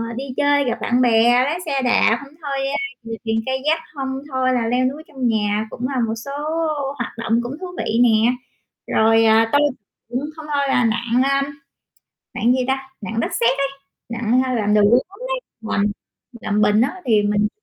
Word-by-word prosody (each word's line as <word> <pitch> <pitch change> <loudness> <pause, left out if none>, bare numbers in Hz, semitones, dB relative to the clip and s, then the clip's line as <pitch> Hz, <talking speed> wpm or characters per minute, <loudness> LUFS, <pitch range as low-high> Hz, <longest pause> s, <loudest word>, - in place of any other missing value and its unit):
đi 265 - -4
chơi 285 0 +3
gặp 240 -1 -1
bạn 245 +3 +1
bè, 240 +1 +4
lái 320 +5 -1
xe 275 -3 -1
đạp, 240 -2 +3
hông 275 - -17
thôi, 280 -2 -3
ơ, 280 - -2 0.3
chèo 225 0 -4
thuyền 225 0 +1
kayak 275 +5 0 0.2
hông 265 -1 -3
thôi 260 -1 +1
là 235 -2 0
leo 250 +2 +1
núi 285 +5 -3
trong 265 -6 -2
nhà 215 -1 0
cũng 245 +3 -4
là 265 - -1
một 225 - -2
số 275 - -6 0.7
hoạt 235 - -3
động 230 0 +1
cũng 255 +4 -5
thú 370 - -4
vị 225 - -1
nè. 225 0 +4 0.6
Rồi 225 +1 +4 0.3
tôi 285 - +5 0.5
cũng 245 +2 -2 0.2
hông 315 -1 -9
thôi 280 -1 +1
là 250 -2 +3
nặn, 235 +2 +1
ơm, 275 0 +2 0.9
nặn 240 - +2
gì 255 - +1
ta, 265 0 -1
nặn 225 +2 -3
đất - - -2
sét 235 0 +3
ấy, 275 0 +1 0.4
nặn 235 +2 +1
hay 255 -1 -1
làm 210 -2 +1
đồ 210 - +5
gốm 250 - +2
đấy, - - -2 0.2
làm 210 -2 0 0.6
làm 210 -2 0
bình 210 +1 +4
á 260 +8 +1
thì 215 -3 +4
mình 205 0 +1
245 Hz, 195 wpm, -20 LUFS, 225-270 Hz, 0.9 s, tôi